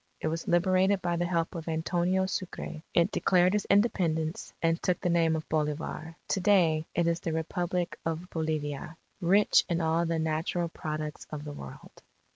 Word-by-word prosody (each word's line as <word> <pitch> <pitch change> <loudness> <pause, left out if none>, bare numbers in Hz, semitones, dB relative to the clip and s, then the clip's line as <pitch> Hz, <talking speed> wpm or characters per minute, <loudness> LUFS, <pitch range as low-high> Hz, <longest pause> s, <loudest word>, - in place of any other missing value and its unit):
It - - -1
was 165 +1 -4
liberated 185 +2 +3
by 175 -1 0
the 175 +1 0
help 170 -2 0
of 165 -1 -6
Antonio 175 +3 +1
Sucre. 185 -4 -5
It 170 +4 +3
declared 180 0 +3
its 210 -1 0
Independence, 170 -6 +1
and 165 0 +1
took 180 -2 +1
the 180 - 0
name 165 -1 +3
of 155 - -4
Bolivar. 155 +1 -2
To - - +1
day 170 -5 +3
it 170 - +2
is 170 0 +1
the 165 - -3
Republic 175 +2 -2
of 165 +2 -3
Bolivia, 155 -1 -3 0.2
"rich 195 +4 +5
in 170 -1 +1
all 165 +1 +1
the 165 0 0
natural 160 +2 -1
products 155 -1 -5
of 150 -1 -6
the 150 -1 -6
world." 65 - -11
165 Hz, 175 wpm, -29 LUFS, 160-180 Hz, 0.2 s, rich